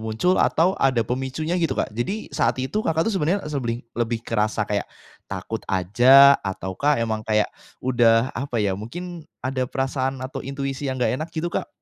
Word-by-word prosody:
muncul 110 +12 +1
atau 175 +4 +3
ada 130 -4 +3
pemicunya 135 +7 -3
gitu, 165 - 0
Kak? - - -1
Jadi 145 - -4
saat 130 -5 +1
itu, 130 +11 -2
Kakak, 160 -5 +1
tuh 225 - 0
sebenernya 190 +2 0
seblih 125 -6 -3
lebih 120 -1 -2
kerasa 110 -1 0
kayak 105 0 -2 0.4
takut - - -4
aja 120 +10 +7
atau 95 -1 -4
kah 145 +9 +2
emang 110 -2 -1
kayak 110 -1 0 0.3
udah 120 -1 +3
apa 130 -1 -4
ya, 105 -3 +1
mungkin 170 - -6 0.2
ada 130 -1 -1
perasaan 135 0 -1
atau 135 0 -5
intuisi 135 0 -4
yang 130 - -2
gak 125 - +1
enak 155 - -3
gitu, 170 +1 -4
Kak? - - -2
130 Hz, 180 wpm, -23 LUFS, 115-150 Hz, 0.4 s, aja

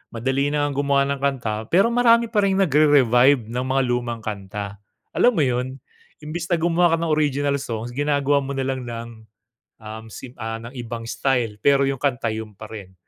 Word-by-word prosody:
madali 135 +4 0
na 145 0 0
ngang 145 -1 -2
gumawa 140 -1 +2
ng 140 - -2
kanta 130 -6 -1 0.2
pero 195 +6 +5
marami 235 -1 +4
pa 215 - +2
ring 195 -1 +2
nagre-revive 140 - +4
ng 125 +2 -2
mga 135 +1 +2
lumang 120 -2 -2
kanta, 100 -1 -6 0.3
alam 245 -3 +3
mo 155 - +3
'yon? 125 0 -1 0.5
Imbes 165 +3 -5
na 175 - +2
gumawa 170 0 +2
ka 165 - -3
ng 160 - 0
original 140 -1 0
songs, 115 -2 -5
ginagawa 145 +1 +1
mo 140 0 -5
nalang 130 -2 -3
ng, 115 0 -6 0.7
um, 110 +1 -8
sim 120 +3 -10
ah, 115 0 -5
ng 115 - -8
ibang 120 -1 -6
style, 115 -2 -1
pero 140 +5 +3
yung 135 -1 0
kanta 125 -4 -1
yun 110 -1 -6
pa 110 +2 -11
rin. 95 -4 -9
135 Hz, 190 wpm, -22 LUFS, 115-145 Hz, 0.7 s, pero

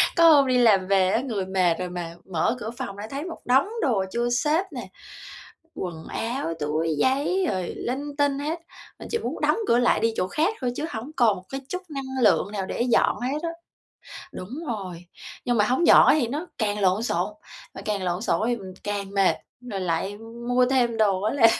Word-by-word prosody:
Có 335 -1 +7
hôm 285 -4 +6
đi 255 -1 +3
làm 210 -6 +4
về 190 -1 +3
á, 225 - +2
người 220 -8 -3
mệt 185 -2 +2
rồi 180 0 -3
mà 175 -2 -5 0.2
mở 170 +7 +1
cửa 220 - -4
phòng 240 -7 -5
lại 205 +1 -6
thấy 280 +2 -4
một 350 -1 -7
đống 265 +8 +4
đồ 220 -10 +1
chưa 240 +2 0
xếp 300 +9 +1
nè, - - -6 0.9
quần 170 -3 -5
áo, 230 -6 -3
túi 155 +2 -1
giấy 285 - +2
rồi 185 -2 -2
linh 280 +4 -4
tinh 285 -1 +2
hết, 310 +4 -2 0.4
mình - - -8
chỉ 460 - +1
muốn 450 - -5
đóng - - +3
cửa 235 - +4
lại 245 -1 +3
đi 225 +1 +1
chỗ 185 - +1
khác 315 - +1
thôi 250 -1 0
chứ 305 - -2
hổng 230 +7 -6
còn 230 -5 +4
một 180 - -11
cái 270 0 -5
chút 365 - -3
năng 265 -3 -3
lượng 205 - +3
nào 200 -2 -3
để 195 - -3
dọn 240 -1 +2
hết 255 +4 -1
á. 335 - -1 0.8
Đúng 185 - -8 0.2
rồi, 185 -7 -5 0.4
nhưng 245 -2 +1
mà 210 - +4
hổng 260 +9 +2
dọn - - +8
á - - +7
thì 240 - +1
nó 295 +8 -3
càng 210 -2 0
lộn 195 +2 +2
xộn, 245 - -1 0.4
mà - - -8
càng 205 -3 -1
lộn 180 +1 -1
xộn - - +1
đó 215 - 0
thì 240 - +1
mình 190 -3 -9
càng 200 -1 -3
mệt, 195 -1 +3 0.3
rồi 230 -6 -5
lại 185 +3 -1
mua 235 +3 0
thêm 245 -3 +1
đồ 200 -4 +2
á 215 +4 0
là 260 -5 +6
230 Hz, 220 wpm, -25 LUFS, 195-265 Hz, 0.9 s, dọn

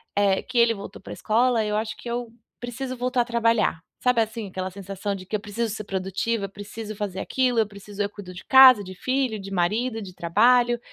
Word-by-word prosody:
eh, 200 -1 +2
que 255 -1 -5
ele 235 -1 +5
voltou 200 -1 -9
pra - - -8
escola, 235 +1 +2
eu 210 - -1
acho 220 0 -3
que 240 - -8
eu 240 -1 -3 0.3
preciso 255 +2 -5
voltar 250 0 +1
a - - -1
trabalhar. 230 -7 +1 0.2
Sabe, 250 -2 +3
assim, 220 -1 -3
aquela 185 0 -4
sensação 195 +1 -5
de 185 - -9
que 215 - -3
eu - - 0
preciso 215 +1 -3
ser 215 -1 -6
produtiva, 195 +3 -2
eu - - -7
preciso 205 +2 -8
fazer 195 -2 -4
aquilo, 250 +1 +1
eu 220 - +2
preciso 205 0 -8
Eu 200 - -2
cuido 200 -3 -10
de 180 - -10
casa, 260 -5 +8
de 185 -1 -9
filho, 255 0 -1
de 195 0 -8
marido, 220 +6 0
de 185 -2 -9
trabalho, 240 +8 +3
215 Hz, 220 wpm, -24 LUFS, 195-240 Hz, 0.3 s, casa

